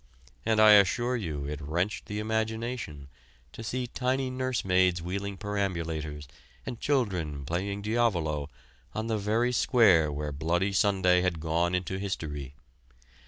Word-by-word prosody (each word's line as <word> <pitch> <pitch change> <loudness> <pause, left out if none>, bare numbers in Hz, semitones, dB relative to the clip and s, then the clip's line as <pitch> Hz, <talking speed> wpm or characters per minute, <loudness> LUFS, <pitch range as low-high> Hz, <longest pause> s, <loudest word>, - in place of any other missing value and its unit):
And 110 -1 +3
I 110 0 +8
assure 110 +5 +4
you 80 - -3
it 75 0 -5
wrenched 90 +8 -2
the 105 - -4
imagination 110 - -3 0.4
to - - -9
see 125 +2 -2
tidy 130 +1 -1
nursemaids 95 -9 +1
wheeling 100 +3 -4
perambulators 85 -7 -3 0.4
and 120 - -6
children 90 - -1
playing 100 +6 -3
diavolo 85 -11 0 0.5
on 110 - -2
the 110 -2 -1
very 110 +4 +1
square 100 - +4
where 75 +1 -3
Bloody 85 +7 0
Sunday 95 -3 +3
had 90 -3 0
gone 85 +3 0
into 95 +1 -2
history. 75 -8 -4
95 Hz, 130 wpm, -28 LUFS, 80-110 Hz, 0.5 s, I